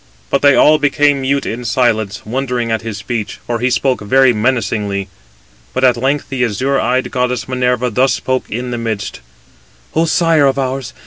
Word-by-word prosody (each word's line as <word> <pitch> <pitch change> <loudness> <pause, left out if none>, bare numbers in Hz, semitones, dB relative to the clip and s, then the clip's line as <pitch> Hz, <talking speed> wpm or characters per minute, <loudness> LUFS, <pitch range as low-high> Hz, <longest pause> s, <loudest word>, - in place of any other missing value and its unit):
But 140 - +2
they 145 -1 +5
all 155 0 +5
became 145 -1 +2
mute 140 +1 0
in 120 +2 -4
silence, 110 -3 0
wondering 125 0 -2
at 110 - 0
his 115 -2 -5
speech; 105 +1 -4
for 120 -1 -2
he 125 +2 +1
spoke 130 -1 0
very 130 +4 +4
menacingly. 105 -4 -1 0.7
But - - 0
at 125 -2 +5
length 135 +4 -1
the 130 -2 -1
azure 130 +5 0
eyed 125 +3 0
goddess 125 -1 -1
Minerva 125 -1 0
thus 130 +4 +2
spoke 130 0 -2
in 125 +3 -4
the 120 - -3
midst: 110 - -4 0.7
"O 165 - +2
sire 165 -3 +3
of 135 0 0
ours! 130 -2 -3
125 Hz, 180 wpm, -16 LUFS, 115-135 Hz, 0.7 s, they